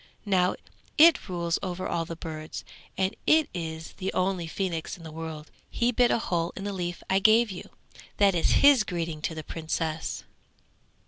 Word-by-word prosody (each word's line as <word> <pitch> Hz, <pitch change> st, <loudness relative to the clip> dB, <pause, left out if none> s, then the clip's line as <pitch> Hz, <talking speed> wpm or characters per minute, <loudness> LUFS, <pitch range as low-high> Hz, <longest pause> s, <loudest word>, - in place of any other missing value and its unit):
Now 185 Hz, -3 st, +2 dB, 0.4 s
it 320 Hz, -, +6 dB
rules 170 Hz, -2 st, -1 dB
over 185 Hz, -1 st, -3 dB
all 165 Hz, -, -1 dB
the 165 Hz, -, -6 dB
birds, 155 Hz, -1 st, -7 dB, 0.3 s
and 190 Hz, +2 st, 0 dB
it 310 Hz, -1 st, +5 dB
is 160 Hz, -1 st, -5 dB
the 190 Hz, 0 st, -2 dB
only 185 Hz, -2 st, 0 dB
phoenix 170 Hz, 0 st, -3 dB
in 170 Hz, -, -14 dB
the 160 Hz, -, -8 dB
world. 160 Hz, -1 st, -7 dB, 0.2 s
He 240 Hz, +1 st, +1 dB
bit 245 Hz, 0 st, +3 dB
a -, -, +3 dB
hole 175 Hz, -6 st, -1 dB
in 195 Hz, -, -6 dB
the 200 Hz, 0 st, -3 dB
leaf 175 Hz, -2 st, -4 dB
I 190 Hz, -, +3 dB
gave 220 Hz, +2 st, +5 dB
you; 180 Hz, -, -8 dB, 0.5 s
that 200 Hz, -1 st, +5 dB
is 170 Hz, -, +2 dB, 0.2 s
his 280 Hz, -6 st, +7 dB
greeting 165 Hz, -5 st, -4 dB
to 160 Hz, -, -3 dB
the 155 Hz, -, -6 dB
Princess.' 160 Hz, 0 st, -3 dB
175 Hz, 180 wpm, -27 LUFS, 165-195 Hz, 0.5 s, his